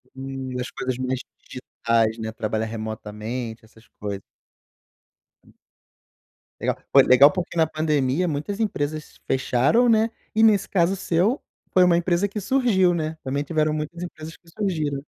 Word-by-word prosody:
Hum, 135 -1 -6
das 125 0 -3
coisas 130 -1 -3
mais 130 0 -2 0.3
digitais, 115 -3 -1
né, 110 0 -4
trabalhar 110 0 -2
remotamente, 110 +1 -5
essas 110 +1 -21
coisas. 100 -2 -4 2.4
Legal, - - -1
pô, - - +7
é - - +9
legal, 135 +3 +7
porque 180 -2 -4
na 160 - +5
pandemia 155 +1 0
muitas 160 +7 -3
empresas 155 -7 -3
fecharam, 135 - +2
né, 225 0 +4 0.3
e 220 - +4
nesse 210 -3 +4
caso 185 0 +2
seu, 190 - +1 0.3
foi 185 - +6
uma 175 -1 +4
empresa 175 +3 +1
que 205 +2 -5
surgiu, 200 -5 +2
né, 160 -1 -3
também 140 +2 -2
tiveram 155 0 0
muitas 155 +3 -4
empresas 160 -2 -8
que 170 - -31
surgiram. 155 -8 -2
150 Hz, 145 wpm, -23 LUFS, 125-180 Hz, 2.4 s, é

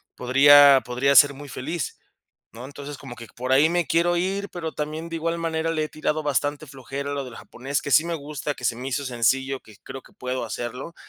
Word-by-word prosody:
podría 140 +2 +7
podría 125 +3 +1
ser 145 -1 +7
muy 140 +1 -11
feliz, 155 +7 -5 0.5
¿no? 120 +2 -10
Entonces, 145 0 -9
como 135 -4 -10
que 115 -1 -10
por 130 +2 -4
ahí 145 +4 +5
me 175 -1 0
quiero 170 +1 +2
ir, 195 +3 -2
pero 165 -3 -5
también 155 +2 -5
de 165 - -4
igual 165 +1 -2
manera 165 0 -2
le 155 -1 -1
he - - -9
tirado 155 0 -2
bastante 145 +1 -1
flojera 140 +1 -6
a - - -2
lo 140 -2 -3
del 120 -2 -10
japonés, 135 +3 -4
que 145 - -5
sí 155 +4 +5
me 170 -1 -2
gusta, 145 0 -5
que 125 - -13
se 115 - +1
me 130 +2 -6
hizo 140 +2 -2
sencillo, 130 +2 0
que 110 - -17
creo 135 - -8
que - - -21
puedo 125 -1 -4
hacerlo, 125 +8 -6
145 Hz, 225 wpm, -24 LUFS, 130-160 Hz, 0.5 s, podría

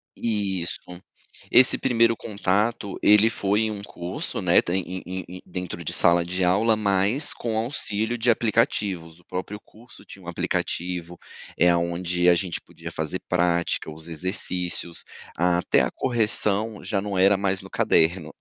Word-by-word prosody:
Isso. 95 -6 -2 0.7
Esse 130 +1 +6
primeiro 115 -2 +2
contato 105 +1 -1
ele 105 +2 +6
foi 105 -1 0
em 110 - -1
um 100 -1 -6
curso, 90 -2 -5
né, - - +4
tem 95 +2 -1
em 95 +1 -6
em 95 0 -5
em 90 +1 -10
dentro 90 -2 -6
de - - -3
sala 85 0 +4
de 90 +2 -2
aula, 110 +5 +3
mas 100 +7 +2
com 115 -2 -3
auxílio 110 -1 0
de 120 +2 +1
aplicativos, 105 - 0
o 90 - -25
próprio 95 +3 -5
curso 115 +3 -17
tinha - - -13
um - - -13
aplicativo, 90 -1 -3 0.4
eh, 90 - +5
aonde 85 +1 +1
a 90 - +6
gente 85 0 -2
podia - - -10
fazer 80 +4 -3
prática, 85 -2 0
os 80 +1 -6
exercícios, 90 0 -3 0.3
até 90 +1 +2
a - - 0
correção 110 -3 0
já 100 - -1
não 100 -2 -3
era 95 +2 +5
mais 95 -1 -1
no - - -12
caderno. 80 -1 +1
95 Hz, 155 wpm, -24 LUFS, 90-110 Hz, 0.7 s, Esse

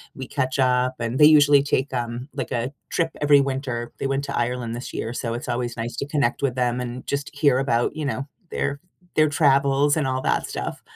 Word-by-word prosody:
we 130 -2 -7
catch 130 -1 -2
up, 125 0 +2
and 115 +4 -2
they 150 - +9
usually 145 -2 +6
take, 140 -1 0
um, 120 +2 -4
like, 135 -5 -4
a 120 +3 -1 0.2
trip 165 -2 0
every 145 -1 +6
winter, 130 -3 -3
they 135 - -1
went 135 +1 -1
to 140 - -4
Ireland 125 +1 0 0.2
this 120 - -7
year 115 +2 -3
so 115 -2 -3
it's 120 - -6
always 120 -1 -2
nice 115 +1 -4
to 140 - -2
connect 145 -4 0
with 130 -3 0
them 125 -1 0
and 125 +1 -6
just 140 0 -2
hear 140 -3 +3
about, 120 -3 0
you 155 -2 -3
know, 135 0 -3 0.2
their 140 0 -2 0.4
their 155 -1 +4
travels 140 0 +3
and 150 - +1
all 130 0 -1
that - - 0
stuff. - - -5
135 Hz, 220 wpm, -23 LUFS, 125-145 Hz, 0.4 s, they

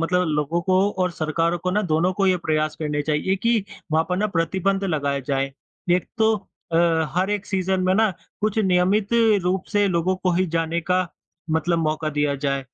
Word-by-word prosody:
मतलब 180 +2 +1
लोगों 150 +2 0
को 190 +2 +2
और 180 - +1
सरकारों 165 +1 -1
को 180 +2 -2
ना, 210 +3 +1
दोनों 175 0 +1
को 195 +1 0
ये 185 -1 +4
प्रयास 155 -2 -1
करने 150 -2 -2
चाहिए 155 +6 0
कि 230 +1 +1 0.3
वहाँ 160 +1 +3
पर 180 - 0
ना 210 +3 +1
प्रतिबंध 195 +2 0
लगाए 145 -6 -1
जाएँ। 135 -1 -1 0.4
एक 180 - -5
तो 220 0 +4 0.4
अ, - - +2 0.4
हर 190 +2 +1
एक 210 -1 -2
सीज़न 190 -1 0
में 185 0 +3
ना 220 +1 +3 0.3
कुछ 215 0 0
नियमित 190 +1 +2 0.4
रूप 185 +1 0
से 205 -1 +3
लोगों 185 +1 +1
को 185 0 0
ही 185 +2 +2
जाने 165 +1 0
का 185 0 +2 0.4
मतलब 165 +2 +1
मौका 155 -1 -1
दिया 145 -1 0
जाए। 140 0 -1
180 Hz, 195 wpm, -23 LUFS, 155-190 Hz, 0.4 s, ये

